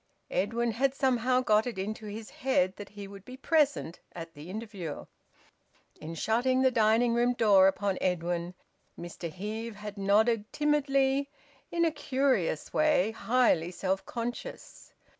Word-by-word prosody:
Edwin 235 +4 0
had 265 +4 0
somehow 255 -1 +2
got 215 -1 +3
it 235 - -5
into 215 +3 -4
his 215 +1 -7
head 190 -8 +1
that 205 -1 -8
he 205 0 -9
would 195 -1 -11
be 255 +4 -10
present 285 - +1 0.2
at 165 -1 -8
the 150 +2 -11
interview. 200 -7 -6 0.9
In 160 +2 -7
shutting 250 +8 +1
the 260 - +4
dining 230 +1 +3
room 240 +1 +2
door 205 -5 +5
upon 195 0 0
Edwin, 175 0 -1 0.4
Mr 170 0 -6
Heve 215 +5 -5
had 210 0 -8
nodded 210 +2 +2
timidly 280 -2 +1 0.4
in 340 0 +2
a 325 - +2
curious 260 - 0
way, 300 -10 +3
highly 220 -6 +2
self 190 +1 -2
conscious. 240 +1 -7
220 Hz, 140 wpm, -29 LUFS, 190-255 Hz, 0.9 s, door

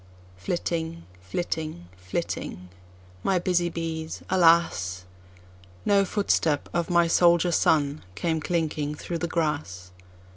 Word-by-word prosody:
Flitting, 165 - -3 0.2
flitting, 155 - -4
flitting, 90 0 -4 0.5
my 190 - +2
busy 175 -1 +1
bees, 165 -1 -4
alas! 165 - +3 0.8
No 200 -1 +4
footstep 165 -7 +1
of 170 -1 0
my 170 -1 +4
soldier 175 +1 +4
son 150 -3 +2
came 160 +10 0
clinking 155 -3 -1
through 170 +2 -4
the 170 - -1
grass. 145 - -2
160 Hz, 105 wpm, -26 LUFS, 145-170 Hz, 0.8 s, No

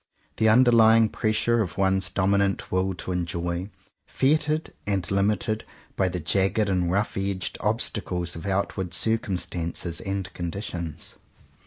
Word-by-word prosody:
The 110 0 +4
under 120 +2 +6
lying 115 -1 +6
pressure 110 +2 +1
of 95 -4 -3
one's 95 0 +2
dominant 100 0 +1
will 95 0 0
to 90 - -6
enjoy, 85 +1 -2 0.4
fettered 155 +3 +1
and 100 -3 0
limited 105 +2 +1 0.3
by 95 - +2
the 90 0 -3
jagged 95 +5 +1
and 90 -2 +1
rough 100 +3 0
edged 95 -1 -2
obstacles 95 -5 -1
of 80 +4 -6
outward 95 -2 -1
cir 115 0 +1
cumstances 85 -3 -3
and 95 -1 -4
conditions. 85 -2 -5
95 Hz, 135 wpm, -25 LUFS, 90-110 Hz, 0.4 s, under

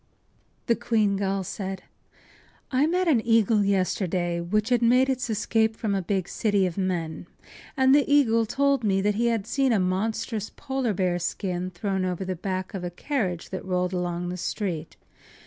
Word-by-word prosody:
” - - -40
The 235 - +3
queen 220 -4 +1
gull 195 0 -1
said: 190 0 -5 0.9
“I 270 +3 +3
met 360 +2 +1
an 255 -9 +3
eagle 225 -2 +3
yesterday, 185 -3 0
which 215 +6 0
had 245 -2 +3
made 250 +3 +4
its 255 -2 -1
escape 220 +1 +1
from 220 -3 -2
a 195 - 0
big 190 0 -1
city 205 -3 +1
of 175 -2 -3
men. 175 -4 -2 0.5
And 265 0 +5
the 285 0 +3
eagle 230 -6 +4
told 280 +1 +1
me 195 -2 +1
he 230 +3 0
had 225 -4 0
seen 270 -2 +1
a 220 - +3
monstrous 215 +4 -1
polar 265 -6 -2
bear 180 -1 0
skin 180 0 -2
thrown 190 +1 -2
over 185 +1 -2
the 185 0 -2
back 185 +1 -4
of 190 -2 -5
a 175 - -2
carriage 185 - -3
that 190 - -4
rolled 180 -1 -1
along 175 -1 -2
the 180 - -4
street. 180 -3 -4
200 Hz, 180 wpm, -26 LUFS, 185-230 Hz, 0.9 s, And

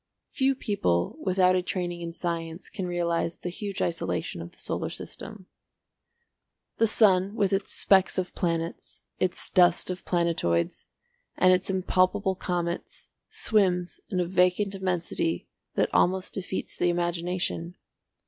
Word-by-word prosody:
Few 270 0 +2
people 145 - 0
without 185 -1 +3
a 185 - +2
training 175 -1 -3
in 170 0 -4
science 165 0 -4
can 190 -3 -4
realise 170 -1 0
the 180 - -5
huge 200 +1 -3
isolation 90 - -2
of 85 - -8
the - - -21
solar - - -2
system. 215 -4 -8 1.3
The 225 - +4
sun 200 -2 +4
with 200 -3 +1
its 195 +1 0
specks 190 -1 +3
of 185 -1 -2
planets, 165 -1 -3 0.2
its 185 -1 0
dust 180 -1 +4
of 185 - -6
planetoids, 165 - 0 0.5
and 185 0 +6
its 185 +1 +1
impalpable 190 +1 +2
comets, 175 -2 -3 0.2
swims 200 - +1
in 185 - -1
a 180 - +2
vacant 180 +3 +2
immensity 190 - -1 0.3
that - - +1
almost 185 +1 +2
defeats 190 -1 -3
the 175 - +2
imagination. 175 0 -1
180 Hz, 135 wpm, -27 LUFS, 170-190 Hz, 1.3 s, and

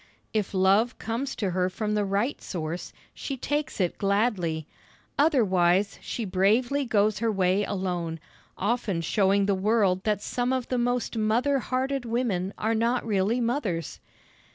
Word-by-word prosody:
If 210 -3 -1
love 195 +6 +3
comes 245 +5 -3
to 200 -5 -1
her 180 +1 +1
from 210 +3 -2
the 210 -1 +1
right 200 +7 -1
source, 170 -1 -5 0.2
she 275 - -5
takes 290 +1 -2
it 180 -3 0
gladly; 195 -6 0 0.5
otherwise 200 - +3
she 230 - -4
bravely 225 +9 +2
goes 215 -3 +2
her 230 0 +1
way 190 0 +2
alone, 180 -5 -3 0.4
often 205 -4 0
showing 195 +3 +2
the 200 - +2
world 195 -1 +2
that 210 -2 0
some 245 +1 -1
of 260 -2 -2
the 250 - 0
most 245 -1 -1
mother 240 +6 +2
hearted 265 +1 -1
women 225 -6 -1
are 220 +1 0
not 230 +2 +1
really 210 +2 +1
mothers. 230 - -2
210 Hz, 150 wpm, -26 LUFS, 190-240 Hz, 0.5 s, love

